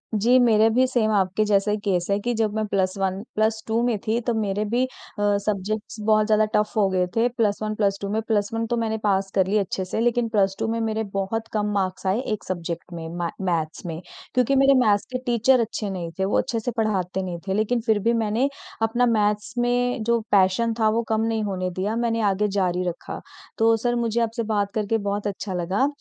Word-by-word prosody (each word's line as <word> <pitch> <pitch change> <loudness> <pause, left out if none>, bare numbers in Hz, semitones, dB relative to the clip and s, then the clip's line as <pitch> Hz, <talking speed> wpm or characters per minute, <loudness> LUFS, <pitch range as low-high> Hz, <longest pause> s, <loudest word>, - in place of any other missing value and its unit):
जी, 235 +5 +4
मेरा 220 -3 +5
भी 255 +1 +5
सेम 230 -4 +1
आपके 195 0 +2
जैसा 205 0 +2
ही 210 - +1
केस 180 -3 +1
है 200 - +3
कि 240 +4 -1
जब 215 -2 0
मैं 215 0 0
+1, 190 -1 -1
+2 220 +1 0
में 235 -3 +1
थी, 225 +2 +2
तो 240 0 -1
मेरे 210 -2 -1
भी 240 +4 +1
अ, - - -6 0.6
सब्जेक्ट्स 210 +2 -3
बहुत 215 -1 +4
ज़्यादा 215 -1 +4
टफ़ 210 0 +2
हो 205 -2 +4
गए 185 -1 +1
थे, 230 +1 +3
+1, 215 -2 -1
+2 200 -1 0
में। 215 +2 0
+1 225 +1 0
तो 240 - -1
मैंने 220 -1 -1
पास 195 -2 +1
कर 190 -1 +3
ली 210 - +2
अच्छे 190 -2 -1
से, 185 - -3
लेकिन 240 0 +1
+2 200 -1 +1
में 230 +1 -1
मेरे 220 0 -1
बहुत 210 +3 -2
कम 210 -1 0
मार्क्स 190 -1 -2
आए 190 +4 +2
एक 210 - -5
सब्जेक्ट 175 -1 -5
में, 165 -1 -6
म 170 0 -3 0.2
मैथ्स 160 0 -2
में, 165 0 -5 0.3
क्योंकि 255 +2 +2
मेरे 275 +1 +5
मैथ्स 210 -4 +3
के 255 - -1
टीचर 245 +1 +3
अच्छे 220 -2 -2
नहीं 175 -3 -4
थे, 190 - +2
वो 195 - +1
अच्छे 235 -3 0
से 235 +3 -3
पढ़ाते 190 -4 0
नहीं 175 -2 -5
थे। 190 - 0
लेकिन 220 +4 +1
फिर 220 -3 +3
भी 235 - +4
मैंने 230 +6 +1 0.3
अपना 230 +2 +2
मैथ्स 210 -2 +1
में 245 0 +1
जो 235 +1 +2
पैशन 200 +4 +3
था, 220 -1 +4
वो 230 +2 +1
कम 220 0 +1
नहीं 225 -1 0
होने 185 -3 -2
दिया, 190 +5 -2
मैंने 230 -1 0
आगे 210 +2 0
जारी 180 -1 +1
रखा। 175 - -5 0.4
तो 225 0 +4
सर, 240 +2 0
मुझे 235 -1 0
आपसे 230 0 -1
बात 200 -1 0
करके 215 +1 +1
बहुत 205 0 -2
अच्छा 200 -1 -4
लगा, 185 +9 +1
215 Hz, 215 wpm, -24 LUFS, 195-230 Hz, 0.6 s, मेरा